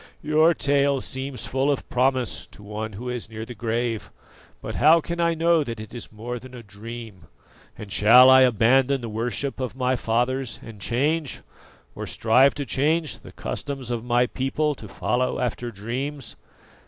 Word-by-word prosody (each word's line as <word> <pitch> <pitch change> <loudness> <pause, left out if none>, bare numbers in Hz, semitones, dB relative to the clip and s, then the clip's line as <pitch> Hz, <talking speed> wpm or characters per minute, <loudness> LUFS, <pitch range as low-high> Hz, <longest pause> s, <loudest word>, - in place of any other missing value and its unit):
"Your 155 +2 +4
tale 140 -1 +2
seems 130 0 -5
full 135 +2 0
of 140 - -3
promise 125 -8 0
to 105 - -16
one 105 +1 -5
who 120 +6 -7
is 125 -3 -4
near 110 0 -6
the 125 - -8
grave; 115 -1 -2 0.5
but - - -6
how 160 +3 +6
can 170 +1 -5
I 170 -1 +2
know 165 -1 +3
that 115 -5 -6
it 110 -1 -9
is 120 - -8
more 120 +3 -6
than 130 +1 -12
a 120 - -10
dream? 105 -3 -10 0.5
And 105 -2 -9
shall 125 +6 +7
I 130 0 +8
abandon 130 +3 +3
the 115 - -5
worship 120 +5 -3
of 130 -2 -4
my 130 0 +1
fathers 125 +2 -1
and 110 -3 -11
change, 145 - 0 0.5
or - - -6
strive 130 +5 +3
to 145 - -3
change, 155 +4 0
the - - -13
customs 135 -4 -5
of 115 -2 -2
my 120 0 +2
people 135 +4 -1
to 115 -6 -11
follow 125 +5 -1
after 120 -1 -2
dreams? 120 - -5
125 Hz, 175 wpm, -24 LUFS, 115-140 Hz, 0.5 s, I